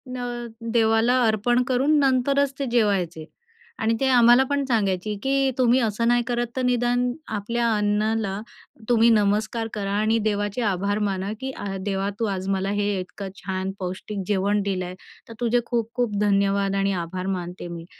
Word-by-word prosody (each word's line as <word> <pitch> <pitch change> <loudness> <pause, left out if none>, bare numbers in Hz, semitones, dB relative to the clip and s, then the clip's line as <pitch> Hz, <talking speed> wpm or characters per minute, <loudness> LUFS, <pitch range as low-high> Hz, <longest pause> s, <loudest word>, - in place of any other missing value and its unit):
न 240 -1 -4 0.3
देवाला 230 +2 +3
अर्पण 240 +3 +2
करून 270 +4 +2
नंतरच 275 +1 +2
ते 275 - -1
जेवायचे. 185 -8 +1 0.5
आणि 225 +1 +1
ते 270 - +1
आम्हालापण 255 +3 +5
सांगायची, 210 -4 0
की 270 0 +2
तुम्ही 250 0 +4
असं 230 0 0
नाही 240 0 +3
करत 240 -1 -1
तर 260 - -1
निदान 245 0 +1 0.3
आपल्या 235 +3 -1
अन्नाला 210 -1 0 0.5
तुम्ही 235 -1 +5
नमस्कार 215 +1 +1
करा 200 -2 -3
आणि 220 +2 +2
देवाचे 205 +3 -2
आभार 200 0 0
माना, 195 +1 -3
की 265 0 -4
अ, 205 - -6 0.2
देवा 195 0 -1
तू 225 - +1
आज 190 -2 -3
मला 195 0 0
हे 205 -2 0
इतकं 190 +1 -7
छान 190 0 -3
पौष्टिक 190 +2 -5
जेवण 205 +1 +1
दिलं 185 -2 -2
आहे. 180 +1 -7 0.3
तर - - -8
तुझे 240 +1 +2
खूप-खूप 235 -2 -1
धन्यवाद 200 -1 +2
आणि 195 0 +1
आभार 185 +2 -5
मानते 175 0 -7
मी. 170 -1 -7
215 Hz, 160 wpm, -24 LUFS, 195-240 Hz, 0.5 s, आम्हालापण